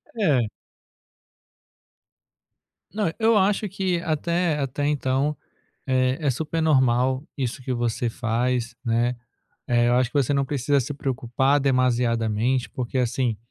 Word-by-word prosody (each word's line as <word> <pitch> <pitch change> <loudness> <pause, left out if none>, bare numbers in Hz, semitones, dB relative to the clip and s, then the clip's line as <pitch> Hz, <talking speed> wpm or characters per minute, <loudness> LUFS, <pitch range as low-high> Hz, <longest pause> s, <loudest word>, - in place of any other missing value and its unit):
É. 145 - +2 2.5
Não. 205 -6 0
Eu 225 -1 +4
acho 205 +2 +2
que 185 -2 -1
até 170 0 0
até 140 +1 -1
então 140 0 0 0.5
é 130 0 +1
é - - +4
super 160 +5 -2
normal 130 -2 +2
isso 130 -2 -3
que 130 - -3
você 120 0 -1
faz, 120 0 -1
né, 120 +2 +1 0.5
eh, 120 0 +3
eu 120 - +3
acho 125 -1 +2
que - - -32
você 140 0 +2
não 140 -1 +1
precisa 140 0 +1
se 135 +4 -3
preocupar 135 +1 0
demasiadamente, 125 -2 +1
porque 125 +1 -4
assim 120 -2 0
130 Hz, 130 wpm, -24 LUFS, 120-145 Hz, 2.5 s, Eu